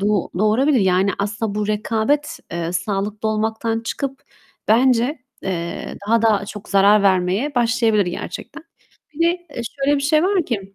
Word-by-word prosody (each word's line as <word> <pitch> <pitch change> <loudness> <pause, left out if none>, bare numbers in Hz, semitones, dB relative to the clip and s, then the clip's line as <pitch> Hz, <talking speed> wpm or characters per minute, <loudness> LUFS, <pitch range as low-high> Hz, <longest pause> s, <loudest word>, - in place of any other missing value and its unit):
do 200 - 0 0.3
doğurabilir. 240 +6 +3
Yani 190 +1 +3
aslında 205 +1 -2
bu 210 0 -1
rekabet, 220 +7 0
eee, 170 0 -3
sağlıklı 205 +3 -2
olmaktan 220 +1 -1
çıkıp 270 +4 -4 0.5
bence, 250 +4 +3 0.2
eee, 170 -3 -4
daha 230 +1 +3
da 215 -3 +3
çok 205 0 -9
zarar 200 +1 +5
vermeye 195 +8 +1
başlayabilir 230 -4 +2
gerçekten. 300 - -6 0.5
Bir 320 - -10
de, - - +3 0.2
eee, 235 - -2 0.2
şöyle 290 +1 +3
bir 280 - -2
şey 305 +2 +3
var 375 -1 +2
ki: 195 -5 -4
220 Hz, 150 wpm, -20 LUFS, 200-250 Hz, 0.5 s, zarar